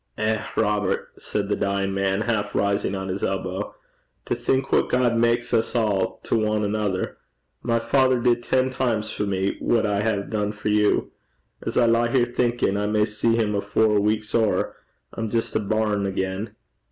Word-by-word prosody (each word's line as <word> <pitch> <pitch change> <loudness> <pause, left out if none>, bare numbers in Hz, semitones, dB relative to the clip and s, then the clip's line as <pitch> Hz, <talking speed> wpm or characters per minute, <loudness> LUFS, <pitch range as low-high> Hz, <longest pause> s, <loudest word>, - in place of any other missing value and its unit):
'Eh, 110 0 0
Robert!' 105 -3 0
said 100 -1 -3
the 105 - +1
dying 100 0 -1
man, 95 +1 0
half 105 -3 -1
rising 100 0 +1
on 95 0 -4
his 95 +1 -4
elbow, 95 +1 -3 0.5
'to - - -1
think 135 +1 0
what - - +3
God 125 -2 +2
maks 120 +1 +1
us 110 - +1
a' 105 -5 +2 0.2
to 110 - +1
ane 105 0 0
anither! 105 -2 -1 0.4
My 115 -1 +1
father 130 +1 +2
did 120 0 +2
ten 130 +2 +1
times 115 -5 -1
for 105 - -2
me 95 0 -1
what 115 -2 +2
I 100 -1 +1
hae 105 -2 0
dune 105 0 -2
for 105 0 -3
you. 105 0 +2 0.5
As - - -3
I 120 - +5
lie 115 +1 +3
here 120 0 +3
thinkin' 120 -4 0
I 105 0 0
may 105 0 +2
see 110 +2 +1
him 110 -2 +1
afore 105 +1 +2
a - - +3
week's 105 0 -1
ower, 110 -3 +1 0.4
I'm 115 -1 -3
jist 115 +1 -2
a - - +3
bairn 105 -1 0
again.' 95 +3 -3
105 Hz, 185 wpm, -24 LUFS, 100-115 Hz, 0.5 s, I